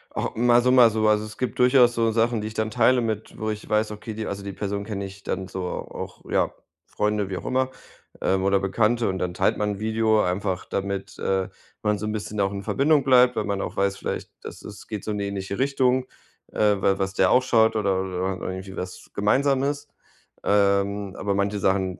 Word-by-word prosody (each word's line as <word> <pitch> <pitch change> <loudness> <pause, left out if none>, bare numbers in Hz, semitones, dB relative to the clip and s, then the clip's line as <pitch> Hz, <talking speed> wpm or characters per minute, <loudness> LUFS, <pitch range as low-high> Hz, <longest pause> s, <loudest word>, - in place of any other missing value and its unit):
Ah, - - -1
mal 120 +1 +4
so, 125 +1 +3
mal 125 -3 +7
so, 110 0 +1
also 105 0 +3
es 110 0 -9
gibt 125 -4 -3
durchaus 125 -1 +5
so 115 -1 +2
Sachen, 115 0 +1
die 105 - -4
ich 110 - -7
dann 110 0 -1
teile 125 +3 +3
mit 110 -2 -3
wo 110 - -2
ich 105 0 -5
weiß, 105 0 +1
okay 105 +1 -7
die 110 0 -4
also, 100 0 -5
die 100 - -5
Person 100 0 -3
kenne 100 -2 -4
ich 100 +1 -11
dann 95 0 -3
so 95 -1 -5
auch, 90 - -6
ja, - - +1 0.3
Freunde, 105 -2 -1
wie 95 - -3
auch - - -8
immer, 130 0 +1 0.5
ähm, 95 0 +1
oder 100 0 +3
Bekannte 110 +4 +1
und 95 -1 -2
dann 90 -1 -2
teilt 95 - +2
man 105 -1 -1
'n - - -12
Video 110 0 +2
einfach, 95 0 -1
damit, 100 0 -4
äh, 95 -1 0 0.3
man 105 -1 +1
so 105 +2 -4
'n 110 - -1
bisschen 105 -1 -3
auch 100 0 +1
in 100 0 -5
Verbindung 140 +4 +2
bleibt, 125 -2 +5
weil 110 - 0
man 100 -1 -2
auch - - -5
weiß 100 0 +1
vielleicht, - - -4
das - - -9
ist 105 -1 -10
geht 105 -3 -6
so 110 - -2
in 105 - -2
die 100 - -2
ähnliche 100 +1 -4
Richtung, 130 -1 +2 0.5
äh, 105 -1 +3
weil 95 0 +2
was 95 0 -1
der - - +3
auch 130 - +6
schaut 115 -3 +3
oder 95 -3 +1
oder 95 0 -2
und 90 - -9
irgendwie 95 +1 -6
was 90 0 -7
Gemeinsames, 140 +6 +1 0.6
ähm, 100 -1 +1
aber 100 +1 -1
manche 100 +1 0
Sachen 95 -1 0
105 Hz, 225 wpm, -24 LUFS, 100-115 Hz, 0.6 s, mal